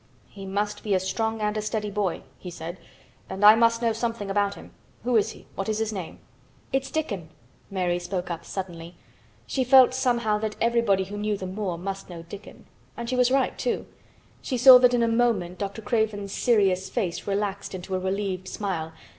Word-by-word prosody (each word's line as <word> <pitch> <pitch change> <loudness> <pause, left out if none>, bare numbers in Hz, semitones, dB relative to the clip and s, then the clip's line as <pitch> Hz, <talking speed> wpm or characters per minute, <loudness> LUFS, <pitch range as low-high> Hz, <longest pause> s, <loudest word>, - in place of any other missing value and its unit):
"He 195 -1 -9
must 205 +1 -2
be 205 -3 0
a - - +3
strong 220 +4 -1
boy 215 - -4
and 210 0 0
a - - 0
steady 210 -1 -2
boy," 200 -4 -1 0.2
he 180 - -7
said. 170 +1 -7 0.5
"And 195 +2 0
I 210 - +11
must 230 +1 +3
know 230 -1 +2
something 230 -3 -3
about 200 0 +1
him. - - -13 0.3
Who 245 0 +1
is 215 - +3
he? - - -16
What 195 +2 -4
is 215 - 0
his 220 0 -1
name?" 185 -5 -6 0.6
"It's 270 0 0
Dickon," 205 - -3 0.4
Mary 180 -2 0
spoke 175 0 -4
up 170 - -5
suddenly. 175 -3 -6 0.5
She 265 - -1
felt 255 0 +7
somehow 240 -5 +1
that 215 -1 -3
everybody 230 -5 +2
who 205 +2 -7
knew 210 0 -1
the 190 - -6
moor 185 -2 -3
must 195 +2 -5
know 170 -2 -8
Dickon. 200 +4 -11 0.3
And 235 +1 -4
she - - 0
was 250 -1 +4
right, 265 0 +1
too. 480 - -1 0.6
She 255 - -2
saw 250 +1 +10
that 250 0 +5
in 235 - +2
a - - +3
moment 225 -7 +1
Dr. 200 +2 -4
Craven's 205 -2 -1
serious 190 -5 +2
face 180 -1 -3
relaxed 200 -1 -2
into 185 +1 -6
a 185 - +1
relieved 190 0 -2
smile. 165 -7 -3
205 Hz, 200 wpm, -26 LUFS, 190-230 Hz, 0.6 s, I